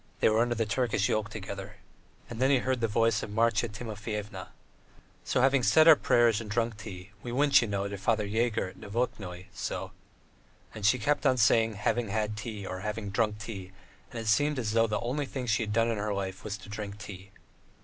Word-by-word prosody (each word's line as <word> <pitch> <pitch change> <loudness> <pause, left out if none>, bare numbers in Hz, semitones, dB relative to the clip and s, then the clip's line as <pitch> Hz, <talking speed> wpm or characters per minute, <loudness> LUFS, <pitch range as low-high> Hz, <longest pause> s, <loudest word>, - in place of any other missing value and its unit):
They - - +4
were 110 +1 +2
under 120 0 +2
the 115 0 0
Turkish 105 -3 +1
yoke 110 -1 0
together." 100 -1 -7 0.5
And 115 - -8
then 130 - +4
he 140 - +5
heard 130 -1 -1
the 115 - +2
voice 115 0 +2
of - - -5
Marya 115 +1 +2
Timofyevna: 105 -1 -6 0.8
"So, 125 - +1
having 135 +1 +4
said 155 +6 +5
our 160 - +10
prayers 120 -5 +3
and 110 - -8
drunk 115 0 -1
tea, 100 -2 -9
we 120 - -6
went, 140 +3 +5
you 115 - -1
know, 100 -1 -1
to 100 0 -5
Father 105 +1 +1
Yegor 110 -1 0
at - - -15
Novokatnoye, 100 -5 -3
so.. 100 - -4 0.4
." - - -31
And 105 -2 0
she 115 - +4
kept 145 +5 +1
on 130 - +3
saying, 110 -1 +4
"having 110 +3 0
had 105 +1 -1
tea" 105 -2 -6
or 95 -1 -5
"having 105 0 -4
drunk 105 0 +1
tea," 100 -3 -7 0.4
and 115 - -6
it 115 - -5
seemed 145 +8 +2
as 115 -4 -1
though 115 +1 +3
the 105 -1 -1
only 135 +4 -2
thing 130 -2 -4
she 110 -2 +1
had 105 -2 -2
done 115 +2 +2
in 110 - -2
her 105 0 -1
life 95 -1 -4
was 105 -1 -4
to 95 - -13
drink 105 -1 -6
tea. 100 -2 -9
110 Hz, 220 wpm, -29 LUFS, 105-120 Hz, 0.8 s, our